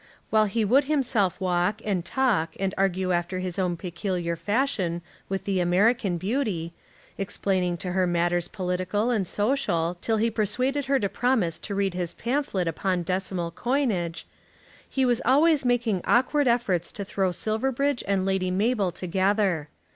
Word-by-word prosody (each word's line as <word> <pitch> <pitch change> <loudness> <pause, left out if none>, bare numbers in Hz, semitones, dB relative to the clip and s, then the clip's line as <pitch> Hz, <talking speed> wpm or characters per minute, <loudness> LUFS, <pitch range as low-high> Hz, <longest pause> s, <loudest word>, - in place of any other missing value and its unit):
While 215 -1 +5
he 215 +2 0
would 265 +7 +4
himself 240 - +1
walk, 180 +2 0
and 195 -5 0
talk, 230 -9 0
and 195 0 -1
argue 190 -1 +1
after 175 +1 -1
his 185 0 -3
own 180 -2 0
peculiar 175 -1 -3
fashion 205 -5 -1 0.3
with 195 0 -2
the 195 -2 0
American 190 +2 +2
beauty, 190 -5 -2 0.5
explaining 190 -2 0
to 180 +2 -4
her 185 0 +2
matters 175 0 +1
political 185 +4 -1
and 205 -6 0
social, 180 -8 0
till 225 -1 0
he 230 +2 +1
persuaded 255 +6 0
her 275 0 +2
to 200 - 0
promise 225 -7 0
to 200 - -5
read 195 -2 0
his 175 -1 -3
pamphlet 235 -8 -1
upon 180 +2 -1
decimal 185 -1 -2
coinage, 215 - -1 0.6
he 265 -1 +1
was 245 -2 +2
always 290 +3 +4
making 235 -6 +1
awkward 260 +3 +3
efforts 205 -8 +1
to 200 - -5
throw 190 -1 0
Silverbridge 245 +8 -1
and 195 -1 +1
Lady 190 -1 0
Mabel 200 0 +1
together. 185 -3 0
195 Hz, 155 wpm, -26 LUFS, 180-235 Hz, 0.6 s, While